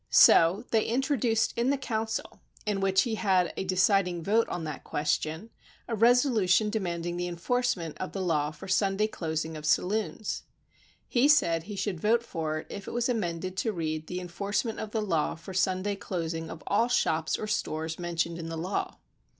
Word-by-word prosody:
So 175 +7 +6
they 220 -1 +3
introduced 240 -2 +1
in 235 +2 +1
the 280 - +2
council 225 -3 -3 0.3
in 210 -2 0
which 195 0 +3
he 235 - -2
had 185 -4 +2
the - - -2
deciding 185 -2 +2
vote 220 +6 +2
on 175 - -3
that 155 -3 -5
question, 155 +7 -2 0.4
a 230 - -1
reso 245 +5 +5
lu'tion 210 -1 +3
demanding 175 -5 -2
the 175 0 -2
enforcement 175 -2 -1
of 185 - -4
the 195 - -5
law 155 -5 +1
for 155 +3 -10
Sunday 195 +2 +2
closing 160 -5 -3
of 155 - -7
saloons. 210 +6 0 0.7
He 250 +3 +3
said 170 - +3
he 205 +1 -6
should 195 -3 -2
vote 230 +5 +2
for 160 -7 -3
it - - -18
if 200 - -7
it - - -5
was 240 +1 +1
amended 185 -5 -2
to 225 - 0
read 155 -4 -3
the 180 - -4
enforcement 200 +6 -2
of 220 - -4
the 215 0 -1
law 165 -7 0
for 170 +4 -10
Sunday 190 +2 +1
clos 175 -4 -3
ing 165 0 -5
of 160 - -9
all 220 +4 +2
shops 160 -10 +1
or - - -4
stores 160 -6 -2
mentioned 170 -1 -2
in 165 0 -5
the 165 - -4
law. 180 +5 -3
190 Hz, 190 wpm, -28 LUFS, 165-220 Hz, 0.7 s, So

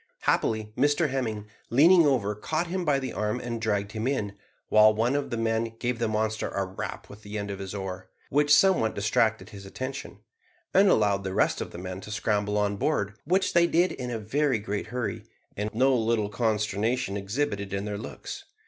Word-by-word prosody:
Happily 110 -1 0
Mr 145 +4 +2
Hemming, 110 -6 -2 0.2
leaning 165 +6 +6
over, 115 -7 +1
caught 155 +11 -2
him 180 +1 -2
by 145 -4 +2
the 130 -1 -4
arm 105 +3 -1
and 115 -2 -4
dragged 105 -2 -1
him 110 +2 -3
in, 110 -8 -1 0.3
while 110 0 +6
one 115 +5 +1
of 140 -1 -1
the 120 - -3
men 115 0 -1
gave 120 0 -2
the 115 - +1
monster 110 0 -1
a 100 - -2
rap 95 +1 -6
with 105 +1 -13
the 105 0 -6
end 100 -1 -4
of 100 - -6
his 95 +1 -6
oar, 95 -1 -6 0.2
which 145 +1 +2
somewhat 150 - +5
distracted 110 +2 +1
his 100 -1 -10
attention, 130 +7 -6 0.6
and 195 +1 +6
allowed 100 - +3
the 95 0 -4
rest - - +2
of - - -4
the - - -10
men 90 +1 -6
to - - -10
scramble 105 -1 0
on 105 -1 0
board, 100 -6 0
which 185 +5 +1
they 170 0 +5
did 175 +2 +2
in 125 -1 -5
a 120 - -2
very 130 +5 0
great 100 -1 -4
hurry, 125 -1 -3 0.3
and 105 +1 -2
no 130 +4 +3
little 110 -3 +1
consternation 110 +1 0
exhibited 100 -1 -2
in 100 +1 -2
their 105 -1 -4
looks. - - -8
110 Hz, 200 wpm, -27 LUFS, 105-130 Hz, 0.6 s, leaning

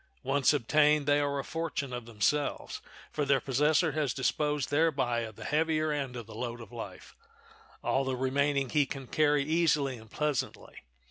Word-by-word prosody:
Once 135 0 +3
obtained 150 +2 +3
they 145 0 +3
are 140 -1 0
a 135 - -2
fortune 160 -5 -3
of 120 -1 -5
themselves, 130 +7 -1 0.3
for 150 - -1
their 140 -1 +3
possessor 150 +6 +2
has 145 -4 -1
disposed 150 0 0
thereby 140 -6 +2
of 110 -2 -5
the - - -9
heavier 155 0 +1
end 140 -4 -3
of 120 -2 -6
the 110 - -12
load 120 +1 -4
of 115 -4 -11
life; - - -9 0.7
all 135 - +1
the 130 -1 -1
remaining 135 +1 0
he 145 -3 +3
can 135 0 -6
carry 150 +1 +2
easily 150 -4 +1
and 110 -1 -14
pleasantly. 145 -2 -3
140 Hz, 175 wpm, -30 LUFS, 130-150 Hz, 0.7 s, Once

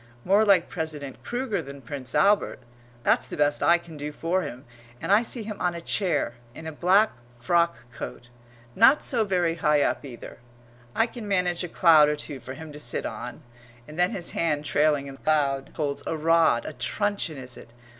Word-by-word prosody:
More 200 +4 +4
like 195 -5 +4
President 150 -5 -6
Kruger 240 -4 -2
than 140 +1 -10
Prince 130 0 -5
Albert 205 +1 +3 0.5
that's - - +2
the - - -7
best 145 0 +2
I 170 - +5
can 170 -2 -12
do 150 +1 -5
for 170 +5 -1
him; 140 -4 -7 0.3
and - - -3
I 205 +2 +6
see 235 0 -3
him 210 -1 -7
on 175 -1 0
a - - -4
chair, 170 - 0 0.2
in 160 - -9
a 160 - -4
black 190 +7 +3 0.3
frock 170 +5 +1 0.2
coat, 120 +1 -8 0.5
not 260 +7 +6
so 235 -4 +2
very 180 -5 +1
high 150 -2 +3
up - - -1
either; 125 -5 -10 0.6
I 225 - +4
can 235 -2 -8
manage 180 -3 +1
a 180 - -5
cloud 160 -4 +6
or 150 - 0
two 145 -2 -6
for 130 +1 -8
him 160 +1 -9
to 150 - -9
sit 120 -5 0
on; 120 +2 -6 0.4
and 155 +3 -9
then 180 +1 +4
his 175 -3 -4
hand 150 -3 -1
trailing 145 -1 +2
in 135 - -8
the 135 - -16
cloud 140 -3 +1
holds 145 -2 -2
a 160 - -2
rod, 160 -6 +3
a - - -5
truncheon 200 +4 -1
is 125 -2 -8
it? 115 - -13
160 Hz, 200 wpm, -26 LUFS, 145-185 Hz, 0.6 s, I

